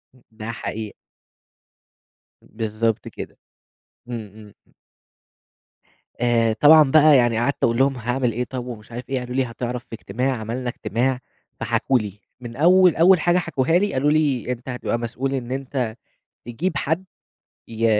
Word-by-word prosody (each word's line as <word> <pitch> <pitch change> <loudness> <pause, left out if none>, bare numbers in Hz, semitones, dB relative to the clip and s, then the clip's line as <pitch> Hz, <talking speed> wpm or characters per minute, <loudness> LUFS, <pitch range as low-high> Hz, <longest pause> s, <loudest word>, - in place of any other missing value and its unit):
ام 125 - -24
ده 110 +1 -6
حقيقة. 110 -1 -6 1.5
بالضبط 110 0 -2
كده، - - -8 0.7
امم 115 -3 -5 0.3
امم. - - -35 1.5
آآ 115 -2 +2
طبعًا 150 +2 +6
بقى 155 -1 +7
يعني 120 -2 +2
قعدت 140 +4 -1
أقول 115 0 +2
لهم 135 +1 +3
هاعمل 125 +1 -1
إيه 125 - -1
طب 125 0 -6
ومش 115 -2 -9
عارف 120 +1 -7
إيه، 130 -1 -1
قالوا 125 0 -6
لي 135 - +2
هتعرف 120 +1 -5
في - - -16
اجتماع، 125 +5 -2
عملنا 120 +3 -4
اجتماع 125 +3 -1 0.4
فحكوا 120 +3 +1
لي، 105 -2 -7 0.2
من 120 -1 -8
أول 180 +4 +5
أول 175 +2 +6
حاجة 175 +3 +2
حكوها 160 -5 -1
لي 205 +1 -1
قالوا 145 +3 +2
لي 145 -5 +1
أنت 125 +1 -6
هتبقى 125 -1 -2
مسؤول 125 +3 -3
إن 125 -2 -4
أنت 130 -4 -3 0.5
تجيب 150 +11 -3
حد 160 +5 -1 0.6
ي 115 0 -2
125 Hz, 150 wpm, -22 LUFS, 115-135 Hz, 1.5 s, بقى